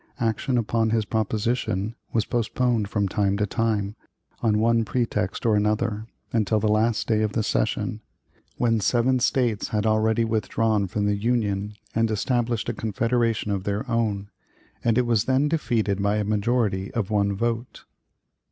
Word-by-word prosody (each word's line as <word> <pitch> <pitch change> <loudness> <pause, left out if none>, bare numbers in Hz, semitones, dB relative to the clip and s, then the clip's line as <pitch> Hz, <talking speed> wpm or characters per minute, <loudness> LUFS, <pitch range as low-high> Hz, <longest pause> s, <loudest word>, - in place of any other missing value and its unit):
Action 115 +2 0
upon 115 0 +1
his 110 -1 +1
proposition 110 -1 -1 0.2
was 110 -2 +1
postponed 120 -2 0
from 105 -2 0
time 100 +1 0
to 105 - +1
time, 105 -2 -1 0.5
on 110 -3 +2
one 115 +1 +3
pretext 110 -4 -2
or 110 -2 +4
another, 105 +1 0 0.3
until 110 -1 +2
the 110 - 0
last 110 +2 +2
day 110 -2 +2
of 105 -1 0
the 110 - 0
session 110 +1 -1 0.6
when 115 -2 +2
seven 120 +4 +2
States 120 -3 +1
had 105 0 -1
already 110 +1 +2
withdrawn 110 -1 0
from 105 +2 -1
the 105 0 +2
Union 105 -2 -1 0.2
and 115 0 +2
established 120 +1 0
a - - -1
confederation 115 0 0
of 95 -2 -1
their 105 +5 -2
own 105 -4 -1 0.5
and 115 -1 +2
it 125 - +3
was 115 -2 +2
then 135 +2 +2
defeated 115 - 0
by 100 +1 +2
a 105 - 0
majority 105 -2 0
of 110 -3 -1
one 100 -1 +1
vote. 115 +3 -3
110 Hz, 160 wpm, -24 LUFS, 105-115 Hz, 0.6 s, or